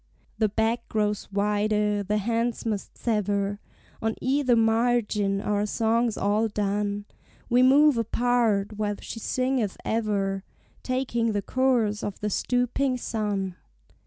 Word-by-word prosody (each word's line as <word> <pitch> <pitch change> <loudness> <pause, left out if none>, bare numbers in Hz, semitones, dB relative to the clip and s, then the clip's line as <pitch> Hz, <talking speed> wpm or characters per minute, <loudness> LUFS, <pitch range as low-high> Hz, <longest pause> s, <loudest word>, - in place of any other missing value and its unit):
The 215 -2 +3
beck 225 +3 -1
grows 210 -2 -1
wider, 210 +1 +1
the 205 +2 -1
hands 230 +3 -1
must 210 -3 -3
sever, 205 -2 -1 0.4
On 225 0 0
either 260 -1 +2
margin, 225 -3 +2
our 205 +1 0
songs 230 +1 +1
all 210 +3 +1
done, 205 0 -1 0.5
We 245 +1 +5
move 275 0 +5
apart, 225 -3 +1
while 205 -1 0
she 225 - -7
singeth 255 -3 -1
ever, 200 -3 -1 0.4
Taking 240 -3 -1
the 205 -1 -1
course 240 -5 +1
of 205 - -4
the 210 0 -2
stooping 250 +4 0
sun. 205 -6 -2
215 Hz, 125 wpm, -26 LUFS, 205-240 Hz, 0.5 s, We